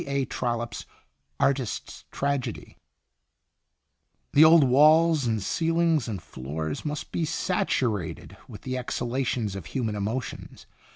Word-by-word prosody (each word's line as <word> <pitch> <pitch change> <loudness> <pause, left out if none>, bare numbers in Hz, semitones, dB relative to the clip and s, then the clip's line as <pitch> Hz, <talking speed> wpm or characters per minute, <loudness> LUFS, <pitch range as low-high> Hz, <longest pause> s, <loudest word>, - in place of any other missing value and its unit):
A. 140 -1 0
Trollope's 120 -2 -3 0.5
"Artist's 135 -4 -1
Tragedy:" 140 -4 -3 0.8
" - - -50
The 145 - +7
old 160 -1 +8
walls 155 +2 +5
and 110 -3 -1
ceilings 165 - +1
and 105 -4 -4
floors 75 +2 -5
must 150 -1 -5
be 170 - -1
sat 165 +3 -1
urated 105 -9 -2
with - - -11
the 130 0 -3
exhalations 120 -4 -2
of 95 -4 -7
human 115 -5 -2
emotions! 105 +5 -5
130 Hz, 120 wpm, -26 LUFS, 110-150 Hz, 0.8 s, old